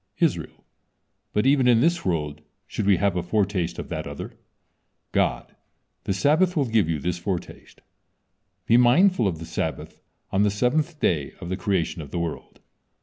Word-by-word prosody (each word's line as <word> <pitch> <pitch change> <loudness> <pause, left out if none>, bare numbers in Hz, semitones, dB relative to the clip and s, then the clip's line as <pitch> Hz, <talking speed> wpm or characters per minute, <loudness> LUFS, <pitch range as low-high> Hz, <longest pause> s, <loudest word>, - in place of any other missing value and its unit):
Israel: - - -1 0.7
"But 105 - +1
even 135 -2 +4
in 120 -2 +5
this 170 +6 +2
world 75 -5 -2 0.2
should 105 - -3
we 100 -3 +5
have 100 0 +1
a 90 - 0
foretaste 95 -1 -1
of - - -6
that - - -4
other." - - -7 0.8
God: - - 0 0.5
"The 95 - 0
Sabbath 160 - +3
will 145 - +3
give 110 -8 +2
you 80 - 0
this 90 +4 -3
foretaste. 90 0 -6 0.8
Be 115 - +5
mindful 125 - +4
of 85 -4 -2
the 80 - -8
Sabbath - - -4 0.3
on 95 - +2
the 105 - +4
seventh 145 - 0
day 75 - 0
of 85 - -7
the 95 - -1
creation 90 -4 -1
of 75 - -9
the - - -5
world." 85 -2 -5
100 Hz, 170 wpm, -24 LUFS, 85-125 Hz, 0.8 s, in